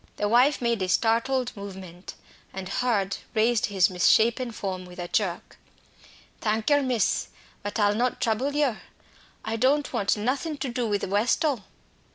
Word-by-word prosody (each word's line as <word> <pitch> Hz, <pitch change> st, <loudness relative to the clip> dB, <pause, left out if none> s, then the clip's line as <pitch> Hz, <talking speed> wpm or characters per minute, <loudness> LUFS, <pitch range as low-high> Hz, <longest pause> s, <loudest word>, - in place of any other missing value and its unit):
The 205 Hz, -, -1 dB
wife 250 Hz, +5 st, +3 dB
made 235 Hz, -3 st, +1 dB
a 185 Hz, -, -1 dB
startled 240 Hz, +5 st, +1 dB
movement, 190 Hz, -3 st, -9 dB, 0.4 s
and 190 Hz, -1 st, -6 dB
Hurd 200 Hz, -3 st, 0 dB, 0.2 s
raised 225 Hz, +1 st, +2 dB
his 190 Hz, -3 st, +3 dB
misshapen 230 Hz, +7 st, +3 dB
form 190 Hz, -4 st, -4 dB
with 180 Hz, 0 st, -13 dB
a 175 Hz, -1 st, -5 dB
jerk. 180 Hz, -2 st, -2 dB, 0.8 s
"Thank 220 Hz, +4 st, 0 dB
yer, 290 Hz, 0 st, +5 dB
miss, 250 Hz, -6 st, 0 dB, 0.3 s
but 205 Hz, -, -4 dB
I'll 205 Hz, -1 st, +3 dB
not 245 Hz, +4 st, 0 dB
trouble 250 Hz, +6 st, 0 dB
yer. 280 Hz, -7 st, +1 dB, 0.6 s
I 220 Hz, +1 st, -2 dB
don't 275 Hz, +5 st, +2 dB
want 205 Hz, -3 st, +1 dB
nothing 275 Hz, +8 st, -2 dB
to 270 Hz, -1 st, -3 dB
do 240 Hz, -1 st, -2 dB
with 205 Hz, -1 st, -1 dB
Westall." 220 Hz, -, +1 dB
225 Hz, 155 wpm, -26 LUFS, 200-250 Hz, 0.8 s, yer